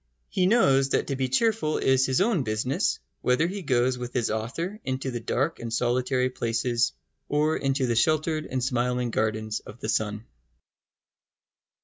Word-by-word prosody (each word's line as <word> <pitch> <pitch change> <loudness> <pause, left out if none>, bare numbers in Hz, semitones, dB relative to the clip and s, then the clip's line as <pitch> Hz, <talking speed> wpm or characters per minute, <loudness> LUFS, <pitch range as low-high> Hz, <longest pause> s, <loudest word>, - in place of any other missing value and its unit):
He 185 -1 +2
knows 135 - +4
that - - +1
to 135 - -2
be 130 -1 -1
cheerful 205 - +1
is 130 0 +3
his 130 +4 +2
own 200 -5 +2
business, 110 - 0 0.2
whether 125 +6 +2
he 195 +3 -3
goes 125 -4 +1
with 125 0 -6
his 120 -4 +1
author 150 - -3
into 130 0 -2
the 120 - -3
dark 135 +7 -1
and 115 -1 -5
solitary 125 +2 +1
places 120 0 0 0.4
or 150 +2 +2
into 135 -1 0
the 120 -2 0
sheltered 155 +4 +1
and 130 -1 -2
smiling 125 -1 0
gardens 110 -1 -1
of 110 - -13
the 110 - -4
sun. 110 0 -1
130 Hz, 160 wpm, -26 LUFS, 120-150 Hz, 0.4 s, knows